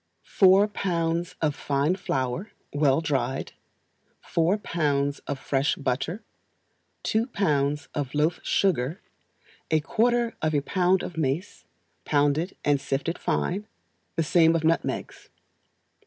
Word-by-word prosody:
Four 195 +1 +5
pounds 170 -4 -1
of 150 -2 +2
fine 145 +5 0
flour, 140 - -2 0.2
well 145 0 +3
dried; 135 -4 -1 0.7
four 170 +4 +1
pounds 145 -7 0
of 140 - -2
fresh 135 +1 0
butter; 140 - -2 0.8
two 225 +2 +1
pounds 150 - 0
of 145 -2 -3
loaf 155 +3 +1
sugar; 170 -3 +1 0.7
a 160 - +3
quarter 235 +7 +1
of 155 -1 +1
a 145 - +2
pound 185 +4 +2
of 175 - -7
mace, 155 +5 -2 0.4
pounded 145 +4 +1
and 145 -2 +3
sifted 140 +5 -2
fine; 205 +4 -1 0.5
the 165 - +1
same 165 +1 +4
of 165 - 0
nutmegs. 165 +1 -1
160 Hz, 120 wpm, -26 LUFS, 140-185 Hz, 0.8 s, Four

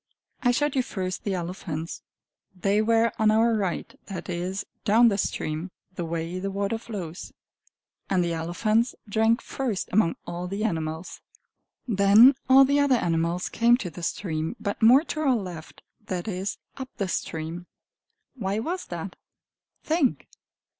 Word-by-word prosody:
I 245 - +3
showed 290 +3 +1
you 260 - +3
first 185 -6 -4
the 200 -2 0
elephants; 170 -2 -5 0.5
they 200 +3 +2
were 230 +1 +3
on 220 -1 +4
our 225 +2 +4
right 195 -5 -2
that 195 -1 -6
is, 180 +3 -3 0.2
down 230 +3 +6
the 200 - 0
stream, 155 0 -2 0.2
the 175 -2 -4
way 165 +2 -3
the 195 +1 -3
water 200 +3 -2
flows. 185 -8 -7 0.8
And 185 -2 +2
the 170 -1 -1
elephants 215 +9 0
drank 225 +3 +2
first 245 -8 -3
among 185 -4 +3
all 175 +1 -5
the 200 +3 -3
animals. 160 -4 -3 0.7
Then 210 +4 +7 0.2
all 270 +1 +8
the 280 +2 +2
other 285 -2 +4
animals 170 -3 0
came 235 +1 +4
to 185 -9 -5
the 175 - -9
stream, 165 +1 -2
but 200 - -3
more 250 +6 +7
to 315 - -4
our 275 -5 +3
left 180 -7 -7 0.2
that 180 0 -3
is, 190 -1 -3 0.2
up 265 -1 -6
the 200 - -1
stream. 165 0 -4 0.7
Why 200 -6 -2
was 345 +11 -3
that? - - -6 0.7
Think! 310 -4 +1
200 Hz, 155 wpm, -26 LUFS, 175-230 Hz, 0.8 s, all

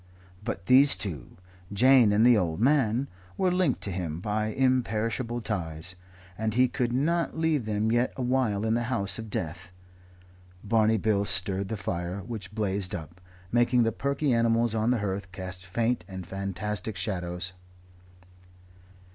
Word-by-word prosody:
But 95 - -4
these 135 +5 +6
two 80 - -6 0.3
Jane 125 +1 +6
and 105 +3 +4
the 125 -1 +7
old 85 -6 0
man 130 -1 +2 0.3
were 185 -1 +2
linked 180 -7 +1
to 100 - -1
him 85 -3 -3
by 105 +3 -1
imperishable 120 -1 0
ties, 85 -5 -4 0.4
and 110 +2 -2
he 130 +1 +5
could 120 -1 -1
not 160 +7 0
leave 160 -6 +1
them 110 +1 0
yet 120 +2 +2
awhile 125 -5 0
in 110 - +1
the 120 +1 0
house 100 -6 0
of 110 -1 -7
death. 85 -2 -4 0.9
Barney 110 +1 +3
Bill 105 -1 +1
stirred 95 0 +1
the 110 - -3
fire, 90 0 -3
which 105 -2 -7
blazed 100 -3 -1
up, 85 +2 -9 0.3
making 120 +1 +3
the 115 - +1
perky 140 +3 0
animals 115 0 +2
on 110 +1 +1
the 125 - +3
hearth 95 -2 -3
cast 95 0 -7
faint 115 +6 0
and 95 -2 -7
fantastic 100 +2 -4
shadows. 90 -2 -3
110 Hz, 150 wpm, -27 LUFS, 95-120 Hz, 0.9 s, the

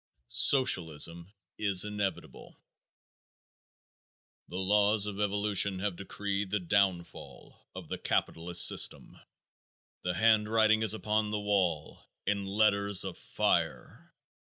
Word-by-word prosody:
Socialism 85 - +2 0.3
Is 100 -3 +2
Inevitable. 105 -2 -6 1.9
The 90 - -10
laws 105 +2 +1
of 105 -1 -6
evolution 100 -1 0
have 95 0 -4
decreed 100 +1 -5
the 105 +2 -2
downfall 90 -1 -4
of - - -10
the - - -6
capitalist 85 +2 +2
system. - - +2 0.9
The 90 0 -4
handwriting 110 +1 +2
is 110 -1 +1
upon 110 0 -2
the 105 0 -3
wall 95 -7 -2 0.2
in 100 0 -2
letters 100 -1 +3
of - - -6
fire. - - -3
100 Hz, 105 wpm, -29 LUFS, 95-105 Hz, 1.9 s, letters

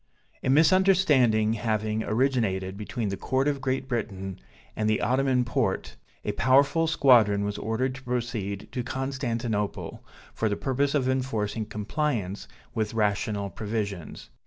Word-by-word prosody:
A - - 0
misunderstanding 150 - +4
having 110 -1 -1
originated 110 -6 0
between 105 +1 -3
the 95 - -3
Court 130 +2 +1
of 140 -2 0
Great 130 0 -1
Britain, 95 -6 -4 0.4
and 110 0 0
the 110 - +2
Ottoman 130 -1 +2
Porte, 115 - -1 0.3
a 105 - 0
powerful 140 +8 +3
squadron 115 -10 +5
was 100 0 -3
ordered 125 +4 -1
to 130 - -10
proceed 120 -6 -3
to 125 - -2
Constantinople, 120 -5 -3 0.3
for 110 - 0
the 100 - -1
purpose 140 +2 0
of 130 -3 +1
enforcing 115 -5 -1
compliance 105 -3 -2 0.3
with 110 0 -2
rational 105 -1 0
propositions. 105 -5 -5
115 Hz, 135 wpm, -27 LUFS, 105-130 Hz, 0.4 s, squadron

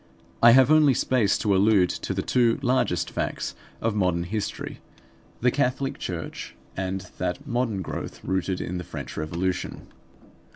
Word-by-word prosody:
I 115 0 +9
have 130 +2 +6
only 150 -4 +6
space 120 -5 +2
to 100 -3 +1
allude 95 -2 +4
to - - -4
the - - -1
two 120 -2 +3
largest 130 0 +1
facts - - -3 0.3
of 115 -1 +1
modern 90 -4 +1
history: 105 +4 -4 0.6
the 125 +1 +4
Catholic 135 0 0
Church 85 -3 -5 0.2
and 95 0 -2 0.2
that 90 -1 -2
modern 120 -5 -1
growth - - -6
rooted 95 0 -1
in 90 0 -3
the - - -5
French - - -7
Revolution. 85 +4 -3
105 Hz, 150 wpm, -25 LUFS, 90-125 Hz, 0.6 s, I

